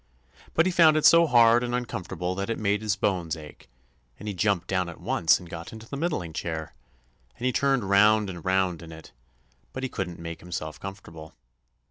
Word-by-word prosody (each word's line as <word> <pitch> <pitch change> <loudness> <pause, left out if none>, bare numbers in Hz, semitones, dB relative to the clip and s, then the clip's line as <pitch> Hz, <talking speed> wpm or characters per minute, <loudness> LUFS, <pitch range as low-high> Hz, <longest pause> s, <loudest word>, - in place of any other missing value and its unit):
But 160 - +4
he 185 - +2
found 160 -3 +5
it 155 - +1
so 170 0 +7
hard 120 -2 +5
and 120 0 -2
uncomfortable 90 -6 -4
that 100 +2 -4
it 115 - -1
made 105 -1 0
his 105 -2 0
bones 90 -5 -1
ache, 75 -4 -13 0.5
and 105 - -9
he 105 - -2
jumped 95 -1 0
down 95 -2 -1
at 85 - -10
once 90 -3 +2
and 90 - -12
got 85 0 -8
into 110 0 -11
the 140 - -6
middling 140 - -2
chair, 80 -1 -4 0.6
and 120 - -5
he 130 - +2
turned 135 -4 +1
round 105 +2 +4
and 90 -4 -7
round 95 -2 0
in 85 -1 -11
it, 80 -4 -12 0.6
but 130 - -5
he 130 - -2
couldn't 90 -6 -5
make 85 -1 -7
himself 80 -3 -6
comfortable. 85 -5 -10
95 Hz, 200 wpm, -26 LUFS, 85-120 Hz, 0.6 s, so